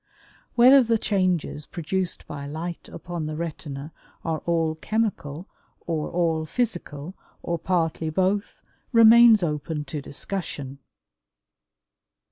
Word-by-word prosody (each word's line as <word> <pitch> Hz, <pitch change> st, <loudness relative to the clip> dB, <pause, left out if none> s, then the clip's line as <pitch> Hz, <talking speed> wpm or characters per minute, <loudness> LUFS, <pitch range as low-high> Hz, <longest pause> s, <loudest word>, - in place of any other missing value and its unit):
Whether 255 Hz, +3 st, +8 dB
the 230 Hz, -2 st, +2 dB
changes 185 Hz, -8 st, -1 dB
produced 180 Hz, +1 st, -3 dB
by 140 Hz, -1 st, -7 dB
light 165 Hz, +4 st, -6 dB
upon 170 Hz, -3 st, -5 dB
the 155 Hz, -, -4 dB
retina 155 Hz, -2 st, -6 dB, 0.3 s
are 160 Hz, -2 st, -1 dB
all 165 Hz, -2 st, +1 dB
chemical 175 Hz, -4 st, -2 dB, 0.4 s
or 160 Hz, -3 st, -2 dB
all 165 Hz, -2 st, 0 dB
physical 175 Hz, -7 st, -3 dB, 0.3 s
or 170 Hz, -1 st, -2 dB
partly 165 Hz, -2 st, 0 dB
both 190 Hz, +5 st, -1 dB, 0.3 s
remains 230 Hz, -2 st, +8 dB
open 150 Hz, -1 st, -2 dB
to 145 Hz, +1 st, -5 dB
discussion. 140 Hz, -3 st, -5 dB
170 Hz, 105 wpm, -25 LUFS, 155-190 Hz, 0.4 s, Whether